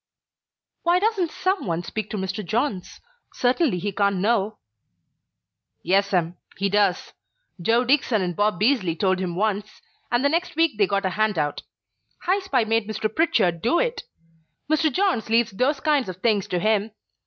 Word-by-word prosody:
"Why 345 +1 +3
doesn't 395 -3 +1
some 375 - -1
one 170 0 -2
speak 215 +4 -5
to 215 - -4
Mr. 190 +2 -3
Johns? 215 -1 -2 0.4
Certainly 255 - +1
he 205 +3 -3
can't 200 0 +1
know 210 +2 0 0.6
" - - -56
"Yes 195 +3 +2
'm, 175 -2 0 0.2
he 200 +1 0
does. 200 -2 +1 0.5
Joe 230 +7 +3
Dickson 250 -5 +2
and 175 -1 -3
Bob 205 -1 +1
Beazley 210 -7 +2
told 185 -1 +2
him 180 -2 -3
once, 210 +1 -2 0.3
and 245 +3 +1
the - - +4
next 340 +3 -1
week 325 -9 +1
they 200 - +4
got 200 +1 -1
a 190 - 0
hand 215 0 0
out. 145 -2 -1 0.6
High 375 +3 +2
Spy 280 -11 0
made 225 -1 0
Mr. 215 0 -3
Pritchard 215 - +2
do 240 - +2
it. - - 0 0.7
Mr. 310 +1 +2
Johns 365 - 0
leaves 230 0 +2
those 255 +9 0
kinds 295 -7 +1
of 185 - -5
things 205 -1 +1
to 180 - -1
him. 215 +2 0
215 Hz, 175 wpm, -23 LUFS, 190-280 Hz, 0.7 s, the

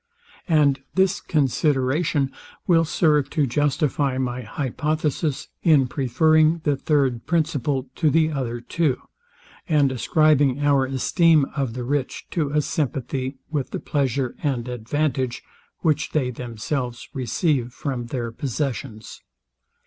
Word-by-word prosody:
And 150 -5 +3 0.2
this 190 +1 +2
consideration 140 0 +1 0.3
will 165 -2 +4
serve 150 -3 +2
to 150 - +1
justify 140 0 0
my 125 -1 -2
hypothesis 150 +4 -2
in 150 -6 +5
preferring 155 +5 +3
the 145 -2 +2
third 135 -4 0
principle 150 -5 0
to 155 - +3
the 160 +1 +3
other 120 -5 -3
two, 150 0 0 0.7
and 145 -4 +3
ascribing 145 0 +3
our 140 -2 +3
esteem 155 +3 +3
of 135 -5 -2
the 125 - -4
rich 135 +1 -2
to 155 -5 0
a 150 +1 +1
sympathy 135 -2 -2
with 145 -4 -2
the - - -4
pleasure 135 -3 -1
and 130 -5 -1
advantage, 125 +1 -2 0.4
which 155 -3 0
they 130 -5 +1
themselves 120 +1 -4
receive 130 -1 0
from 130 -3 -4
their 120 -1 -3
possessions. 125 -3 -4
140 Hz, 120 wpm, -23 LUFS, 125-155 Hz, 0.7 s, in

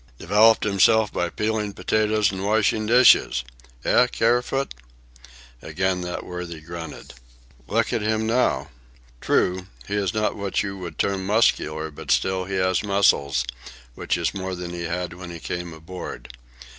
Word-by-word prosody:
"Developed 110 - +4
himself 105 +1 +3
by 90 - -1
peeling 105 0 -2
potatoes 110 -1 +1
and 95 -1 -5
washing 110 +1 +1
dishes. 120 - +5 0.4
Eh, 125 - +4
Kerfoot?" 125 +4 0 0.9
Again 90 +3 -1
that 90 0 -5
worthy 90 -2 -6
grunted. 80 -1 -9 0.5
"Look - - 0
at 115 - 0
him 110 +1 0
now. 110 - +1 0.5
True, 90 +1 +1 0.2
he - - -5
is 100 -3 0
not 110 -1 -1
what 100 -2 -1
you 100 -1 -4
would 85 -4 -7
term 100 -1 0
muscular, 80 -7 +1
but 75 - -11
still 95 -1 +1
he 95 +1 -4
has 95 -1 +1
muscles, 75 -10 +2 0.5
which - - -2
is 85 - -1
more 95 -1 -4
than 90 -1 -6
he 85 -1 -4
had 85 0 -3
when 90 0 -9
he 85 -1 -8
came 90 +1 -5
aboard. 80 -7 -9
95 Hz, 150 wpm, -23 LUFS, 85-105 Hz, 0.9 s, dishes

